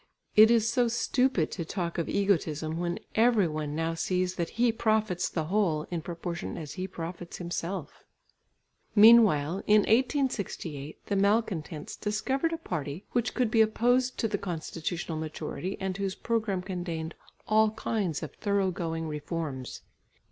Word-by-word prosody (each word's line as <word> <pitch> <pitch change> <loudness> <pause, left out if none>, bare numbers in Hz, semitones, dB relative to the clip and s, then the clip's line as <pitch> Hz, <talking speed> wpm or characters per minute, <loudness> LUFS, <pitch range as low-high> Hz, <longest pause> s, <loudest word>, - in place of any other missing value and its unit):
It 215 +1 +9
is 230 -2 +4
so 240 +1 +2
stupid 240 - +1
to 170 - -3
talk 170 0 -3
of 165 - -2
egotism 160 -5 0
when 175 0 -1 0.2
every 225 -4 +4
one 155 -1 -3
now 165 +1 -1
sees 180 +2 0
that 170 -3 -2
he 240 0 +4
profits 215 -5 +1
the 160 - -2
whole, 165 -3 +1
in 170 -2 -2
proportion 170 +1 -5
as 150 -3 -6
he 185 0 -4
profits 170 -1 -7
himself. 175 -2 -5 0.9
Meanwhile, 205 -7 +6
in 210 0 +6
1868, 210 - -1
the 200 - -1
malcontents 195 -7 0
discovered 265 +9 -1
a 330 - -2
party 150 - -5
which 240 -1 0
could 245 -3 +1
be 225 -2 +5
opposed 245 +4 +2
to 225 - +1
the 205 -2 -2
constitutional 165 -2 -4
majority 160 +4 -4
and 190 -1 -2
whose 195 -1 -2
programme 215 -5 -1
contained 175 -3 -4 0.3
all 215 0 +4
kinds 210 -7 -2
of 155 - -6
thorough 200 -2 0
going 165 -2 -3
reforms. 150 -3 -5
185 Hz, 150 wpm, -29 LUFS, 165-220 Hz, 0.9 s, It